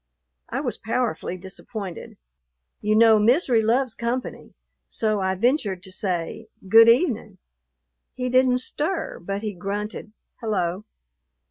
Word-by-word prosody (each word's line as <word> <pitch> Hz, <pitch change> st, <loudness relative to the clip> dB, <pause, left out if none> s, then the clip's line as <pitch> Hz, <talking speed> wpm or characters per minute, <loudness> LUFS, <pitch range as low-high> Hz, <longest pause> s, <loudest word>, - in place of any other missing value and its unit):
I -, -, -2 dB
was -, -, -3 dB
powerfully 225 Hz, -6 st, -2 dB
disappointed. 190 Hz, 0 st, -8 dB, 0.6 s
You 210 Hz, +1 st, +1 dB
know 220 Hz, -1 st, +6 dB
misery 240 Hz, +1 st, +3 dB
loves 235 Hz, +2 st, +1 dB
company; 235 Hz, +3 st, -4 dB, 0.3 s
so 215 Hz, -2 st, 0 dB
I 190 Hz, 0 st, 0 dB
ventured 205 Hz, -, 0 dB
to 190 Hz, -, -9 dB
say, 185 Hz, +2 st, -3 dB, 0.2 s
"Good 225 Hz, +3 st, +8 dB
evening." 230 Hz, -, +2 dB, 0.8 s
He 250 Hz, 0 st, -2 dB
didn't 255 Hz, 0 st, +3 dB
stir, 320 Hz, +7 st, -3 dB
but 195 Hz, +4 st, -4 dB
he 210 Hz, -1 st, -3 dB
grunted, 205 Hz, +4 st, -5 dB, 0.3 s
"Hello." 195 Hz, -3 st, -2 dB
220 Hz, 120 wpm, -24 LUFS, 195-245 Hz, 0.8 s, Good